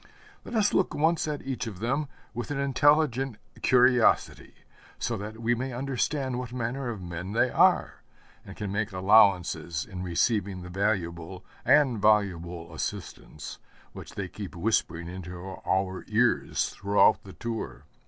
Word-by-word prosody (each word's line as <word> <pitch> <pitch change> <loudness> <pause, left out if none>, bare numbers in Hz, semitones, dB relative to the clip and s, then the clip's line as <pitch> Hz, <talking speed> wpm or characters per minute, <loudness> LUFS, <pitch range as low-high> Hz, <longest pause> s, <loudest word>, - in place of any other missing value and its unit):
Let - - -7
us 210 -2 +3
look 185 - +1
once 160 +1 +2
at 150 -1 -3
each 130 -2 -3
of 105 -5 -6
them 135 +8 -1 0.3
with 120 0 -5
an 145 - -2
intelligent 140 -3 +2 0.2
curiosity, 125 -1 +3 0.4
so - - -2
that 105 +3 -7
we 115 +1 +1
may 130 +2 -3
understand 130 0 -1
what 125 -1 -6
manner 125 +2 -3
of 105 -5 -6
men 90 +3 -6
they 120 +2 +2
are, - - +3 0.4
and 95 -3 -11
can 105 -2 -4
make 105 +1 -1
allowances 95 -4 +3
in 95 -4 -7
receiving 95 +1 0
the 90 - -8
valuable 90 -3 -2 0.2
and 135 -6 +4
voluble 90 -5 +1
assistance 80 -3 -6 0.3
which - - -10
they 100 -2 -3
keep 95 +2 -8
whispering 85 -3 0
into 90 0 -7
our 95 0 -2
ears - - +1
throughout 100 +1 +3
the 95 - -11
tour. 115 -1 -5
105 Hz, 145 wpm, -27 LUFS, 95-125 Hz, 0.4 s, and